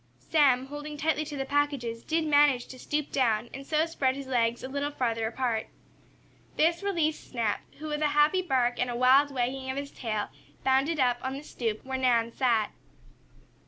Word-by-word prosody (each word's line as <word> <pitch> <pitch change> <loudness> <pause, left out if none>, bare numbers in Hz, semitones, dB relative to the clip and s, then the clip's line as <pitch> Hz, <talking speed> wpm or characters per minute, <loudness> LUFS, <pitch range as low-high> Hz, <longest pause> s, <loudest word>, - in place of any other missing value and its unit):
Sam, 270 -5 +4
holding 295 +2 -7
tightly 310 0 0
to 295 -1 -6
the 270 - -2
packages, 270 -5 -1
did 320 0 0
manage 290 -4 +4
to 255 - -10
stoop 300 +2 -2
down 235 -3 +1
and 275 +1 -8
so 310 0 +2
spread 275 -6 0
his 275 0 -6
legs 240 -2 0
a - - -3
little 280 +2 -2
farther 230 -5 -1
apart. 230 -1 -2 0.9
This 335 +3 +3
released 335 -6 -1
Snap, 230 -5 -1 0.2
who, 310 +1 -6
with 300 0 -2
a 305 - +4
happy 305 +6 +4
bark, 250 -8 +1
and 250 - 0
a 240 - -3
wild 260 +4 +5
wagging 260 0 -2
of 260 - -3
his 280 0 -4
tail, 215 -4 -3 0.3
bounded 270 +4 +2
up 245 -2 +2
on 260 0 -3
the 275 +2 -7
stoop 225 -6 -4
where 265 0 -3
Nan 235 -3 +2
sat. 230 -4 +1
265 Hz, 190 wpm, -28 LUFS, 245-295 Hz, 0.9 s, wild